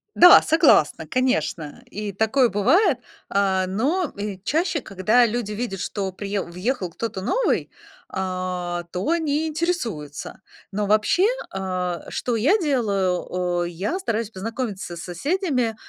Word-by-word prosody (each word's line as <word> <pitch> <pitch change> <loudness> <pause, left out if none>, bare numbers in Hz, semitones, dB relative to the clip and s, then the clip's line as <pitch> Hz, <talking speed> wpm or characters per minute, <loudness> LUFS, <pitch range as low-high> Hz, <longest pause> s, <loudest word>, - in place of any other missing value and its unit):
Да, 355 +1 +9
согласна, 280 - +4
конечно, 160 - -1
и 210 0 -4
такое 220 +6 +3
бывает. 260 - +3 0.3
А, 190 -1 +2
но 285 - 0
и 200 -2 -5
чаще, 320 - 0
когда 215 +5 +3
люди 225 -2 -2
видят, 210 -4 -4
что 195 0 -3
приеу 200 +1 -3
въехал 185 0 -2
кто-то 200 0 -4
новый, 485 - 0 0.4
а, 185 -2 -3
то 185 - -2
они 320 -2 +1
интересуются. 250 - -3 0.3
Но 205 +1 -1
вообще, 215 - +3 0.2
а, 185 -2 -3
что 240 -2 -2
я 295 - +3
делаю, 200 - 0
о, 180 -1 -1
я 185 - -3
стараюсь 230 - -2
познакомиться 210 -3 -5
с - - -8
соседями. 250 - -1
210 Hz, 130 wpm, -23 LUFS, 185-265 Hz, 0.4 s, Да